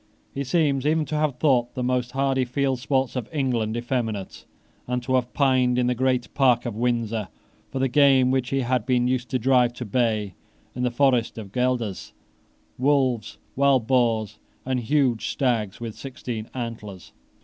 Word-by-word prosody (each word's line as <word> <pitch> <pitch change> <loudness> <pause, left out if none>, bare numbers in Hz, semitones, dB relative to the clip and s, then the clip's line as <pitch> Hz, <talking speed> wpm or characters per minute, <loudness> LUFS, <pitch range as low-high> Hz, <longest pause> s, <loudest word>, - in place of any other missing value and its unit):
He 140 - -3
seems 140 -1 +1
even 155 +1 +1
to 155 - -4
have 150 -3 0
thought 125 -5 +1
the 125 - -2
most 125 0 -1
hardy 135 -1 +1
field 130 +1 -1
sports 130 0 0
of 125 -3 -4
England 120 -7 -1
effeminate, 120 -5 -3 0.4
and 125 0 -2
to 130 +1 -2
have 125 -1 +1
pined 130 -3 +3
in 125 - +2
the 125 - +2
Great 125 0 0
Park 125 -4 +3
of 120 -3 -4
Windsor 115 -3 -1 0.4
for - - -5
the 135 0 +2
game 135 -1 +4
which 130 -2 0
he 135 0 0
had 125 -1 -1
been 125 -1 +2
used 125 -1 -1
to 130 - 0
drive 125 -1 +3
to 125 0 -6
bay 110 -3 0 0.4
in 125 - -4
the 125 - +2
forests 125 -2 +1
of 105 -4 -8
Guelders, 125 -4 -2 0.7
wolves, 130 -5 +1 0.2
and - - -32
wild 135 -4 +4
boars, 110 -4 +1 0.3
and 130 -1 0
huge 125 -2 +1
stags 115 -7 -1
with 115 -2 -5
sixteen 125 -4 -6
antlers. 110 -6 -7
125 Hz, 175 wpm, -24 LUFS, 120-135 Hz, 0.7 s, game